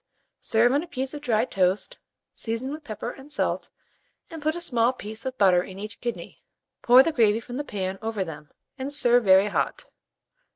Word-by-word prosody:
Serve 235 +1 +3
on 285 +2 +2
a 350 - -8
piece 265 -4 -4
of 295 - -7
dry 230 -4 +1
toast, 195 - 0 0.3
season 230 +4 -3
with 310 0 -8
pepper 225 -1 -5
and 275 +3 -14
salt, - - -1 0.6
and 325 -2 -8
put 310 +2 0
a - - -4
small 240 -7 +2
piece 220 -1 -8
of 260 - -5
butter 185 -3 +5
in 185 +1 -9
each 210 +2 -7
kidney; 240 -1 -6 0.4
pour 250 +2 +7
the 330 - 0
gravy 225 -6 +3
from 245 +2 -8
the 290 - -2
pan 190 -6 -4
over 220 -3 -2
them, 150 -4 -9 0.3
and 265 +2 -4
serve 245 -4 +4
very 190 +2 +6
hot. - - -2
235 Hz, 195 wpm, -25 LUFS, 205-270 Hz, 0.6 s, pour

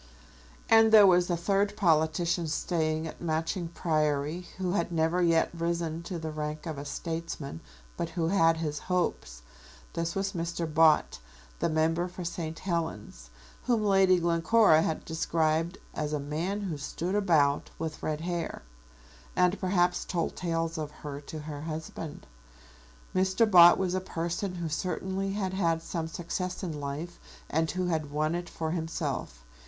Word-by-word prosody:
And 225 0 +6
there 215 -2 +9
was 180 -1 +4
a 175 - +1
third 200 +4 +1
politician 165 -1 +2
staying 155 0 -1
at 160 - -8
Matching 165 +2 -1
Priory 155 0 -1
who 185 -2 -1
had 175 -2 0
never 165 +2 +1
yet 165 -2 +3
risen 170 -1 -2
to 180 - -3
the 160 -1 -4
rank 150 0 -4
of 155 -4 -4
a 140 - -6
statesman, 160 - -5 0.4
but 170 - -2
who 165 -1 -1
had 165 -4 +4
his 150 -2 -3
hopes. - - -1 0.5
This 170 0 -2
was 195 +1 -1
Mr. 170 -1 -2
Bott, 155 - +3 0.4
the - - +1
member 165 +2 +1
for 180 0 -7
St. 165 -1 -4
Helens, 160 - -4 0.4
whom 235 -4 +2
Lady 195 -2 +5
Glencora 170 +1 +4
had 160 -1 -2
described 160 +1 0 0.2
as 150 0 -3
a 150 - 0
man 165 +8 -2
who 170 -7 -4
stood 170 +6 -3
about, 160 -8 +2
with 160 -1 -5
red 155 0 -2
hair, 170 - -3 0.7
and 180 +2 +3
perhaps 180 -2 +1
told 170 -2 -2
tales 165 -1 -2
of 150 -1 -3
her 145 -1 -8
to 160 - -6
her 150 -1 -6
husband. 160 0 -6 0.9
Mr. 190 +4 +3
Bott 175 -5 +8
was 185 -2 0
a 185 - 0
person 175 +1 -3
who 170 -2 -3
certainly 190 +4 -2
had 190 -2 -2
had 165 -4 +1
some 165 -1 -3
success 175 +3 -4
in 160 -5 -4
life 145 +5 -5 0.3
and 160 +1 +1
who 185 +3 -1
had 160 -4 -1
won 155 +2 0
it 175 0 -3
for 160 -1 -3
himself. 155 - -3
165 Hz, 160 wpm, -29 LUFS, 155-180 Hz, 0.9 s, there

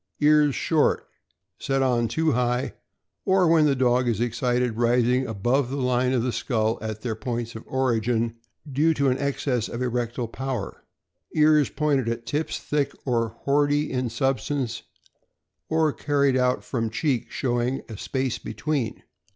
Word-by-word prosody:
Ears 150 -1 +4
short, 160 -3 +1 0.5
set 135 0 0
on 120 -3 +2
too 160 +7 +1
high, 125 0 0 0.5
or 190 -2 +3
when 160 -2 +5
the 140 - +2
dog 125 -1 +2
is 115 -3 0
excited 120 0 0
rising 125 +2 +2
above 120 +5 0
the 140 - -3
line 125 -1 +1
of 125 -3 +1
the 125 - 0
skull 110 -2 0
at 110 -1 -5
their 120 -1 -2
points 115 +1 -4
of 110 - -8
origin, 115 -3 0 0.3
due 150 +4 +2
to 140 -1 +2
an 130 - -1
excess 135 -4 -1
of 120 - -5
erectile 120 -1 -2
power. 130 -3 -5 0.5
Ears 150 -2 +4
pointed 140 -5 0
at 115 0 -4
tips, 150 +6 -2
thick 145 -2 -1
or 115 -4 -1
boardy 145 +1 +2
in 125 -2 -1
substance, 130 0 -1 0.9
or 160 -2 +2
carried 140 -2 +1
out 125 0 +1
from 115 -4 -2
cheek, 125 +1 -1
showing 125 +1 -1
a 115 - -8
space 130 +3 -2
between. 145 -8 -3
125 Hz, 150 wpm, -25 LUFS, 120-140 Hz, 0.9 s, when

